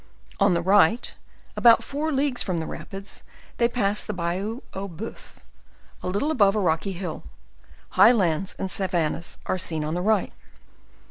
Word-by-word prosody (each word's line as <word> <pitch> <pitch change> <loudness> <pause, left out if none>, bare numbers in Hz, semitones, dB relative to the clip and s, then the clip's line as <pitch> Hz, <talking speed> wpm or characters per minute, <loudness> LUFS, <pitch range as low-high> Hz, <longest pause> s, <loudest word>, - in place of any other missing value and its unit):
On 180 - +4
the 170 - 0
right, 205 +5 +3 0.4
about 235 -1 +6
four 300 +3 -2
leagues 275 -2 0
from 185 -4 -1
the 160 - -2
rapids, 195 +4 -7 0.4
they 235 - +4
passed 210 -4 0
the 210 - -2
"Bayou 185 +8 -2
Aux 195 +1 -4
Boeufs," 195 +5 -9 0.7
a - - -5
little 205 +12 0
above 205 -8 +4
a - - +2
rocky 180 +1 0
hill: 180 +1 -5 0.7
high - - +7
lands 190 -5 0
and 190 - -3
savannas 170 -3 -1
are 185 - -1
seen 160 -3 -1
on 155 +1 -2
the 175 - -1
right. 210 0 +1
195 Hz, 160 wpm, -25 LUFS, 175-225 Hz, 0.7 s, high